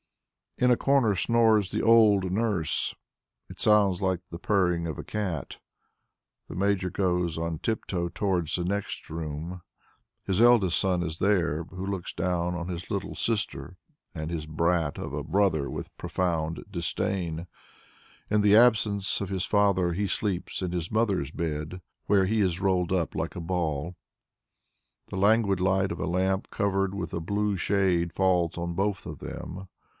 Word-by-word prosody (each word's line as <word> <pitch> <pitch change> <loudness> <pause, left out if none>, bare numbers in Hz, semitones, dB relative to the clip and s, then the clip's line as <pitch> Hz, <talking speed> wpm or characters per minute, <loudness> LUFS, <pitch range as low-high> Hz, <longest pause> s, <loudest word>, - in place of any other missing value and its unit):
In 125 - +3
a 120 - +4
corner 135 -7 +3
snores 110 -1 +3
the - - -1
old 105 -5 +5
nurse; 100 -5 0 0.6
it - - -11
sounds 100 -4 +3
like 95 -2 +1
the 85 - -6
purring 90 -4 +1
of 80 -4 -4
a - - -5
cat. 95 -10 -4 0.9
The - - -7
Major 95 0 +1
goes 90 -3 0
on 80 -1 -3
tip 110 +4 -2
toe 85 -2 -2
towards 90 -5 -1
the 90 - -1
next 100 +3 -3
room. 80 +2 -5 0.6
His 95 +2 +1
eldest 115 -8 +5
son 90 -2 +1
is 80 -1 -4
there 85 -6 +1
who 95 +2 -7
looks 95 -3 -4
down 90 0 -1
on 85 0 -4
his 90 -2 -6
little - - -3
sister 95 -8 -2 0.4
and 80 -3 -5
his 80 -2 -4
brat 80 0 0
of - - -5
a 75 0 -3
brother 80 -3 +1
with - - -7
profound 85 -3 -2
disdain. 85 -2 -2 0.8
In 105 0 +3
the 105 0 +5
absence 110 -4 +4
of 100 - -3
his 95 -2 -1
father 100 -4 +2
he 100 +4 -1
sleeps 95 0 -2
in 90 -2 -2
his 85 -2 -3
mother's 100 -10 +1
bed, 80 +2 -4 0.2
where 100 -2 +4
he 110 +3 +1
is 90 -3 +1
rolled 95 -2 +1
up 90 -4 0
like - - -3
a - - -4
ball. 85 -2 -2 1.1
The - - -7
languid 100 -1 +3
light 95 +1 +2
of - - -5
a - - -2
lamp 95 +2 0
covered 100 -2 0
with 100 -3 -5
a - - -1
blue 100 +4 -1
shade 90 -2 +1
falls 90 -3 +1
on 85 0 -3
both 100 +2 -1
of - - -7
them. 95 +2 -7
95 Hz, 165 wpm, -27 LUFS, 85-100 Hz, 1.1 s, old